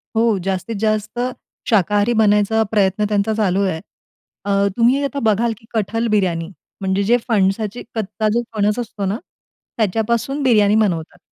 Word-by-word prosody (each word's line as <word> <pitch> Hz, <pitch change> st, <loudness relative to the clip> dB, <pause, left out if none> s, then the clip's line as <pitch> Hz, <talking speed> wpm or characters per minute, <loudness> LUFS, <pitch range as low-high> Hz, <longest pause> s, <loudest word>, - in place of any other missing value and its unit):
हो. 225 Hz, -2 st, +3 dB
जास्तीत 195 Hz, +4 st, -2 dB
जास्त 215 Hz, +2 st, -1 dB, 0.5 s
शाकाहारी 205 Hz, +2 st, +2 dB
बनायचा 210 Hz, +1 st, +3 dB
प्रयत्न 205 Hz, -1 st, +2 dB
त्यांचा 210 Hz, +1 st, +1 dB
चालू 200 Hz, -3 st, +1 dB
आहे. 185 Hz, -5 st, -1 dB, 0.7 s
अ, 200 Hz, 0 st, +2 dB
तुम्ही 250 Hz, +4 st, +3 dB
आता 280 Hz, 0 st, -2 dB
बघाल 225 Hz, +2 st, +1 dB
की 225 Hz, -, -21 dB
कठल 225 Hz, +1 st, -1 dB
बिर्याणी. 170 Hz, -4 st, 0 dB, 0.3 s
म्हणजे 190 Hz, +1 st, 0 dB
जे 240 Hz, -, +6 dB
फणसाची 210 Hz, 0 st, 0 dB
कच्चा 215 Hz, 0 st, -1 dB
जो 235 Hz, -, +2 dB
फणस 210 Hz, +2 st, +1 dB
असतो 215 Hz, -4 st, -4 dB
ना, 195 Hz, +3 st, -1 dB, 0.6 s
त्याच्यापासून 230 Hz, +6 st, 0 dB
बिर्याणी 210 Hz, -5 st, +4 dB
बनवतात. 180 Hz, -7 st, 0 dB
210 Hz, 145 wpm, -19 LUFS, 200-225 Hz, 0.7 s, जे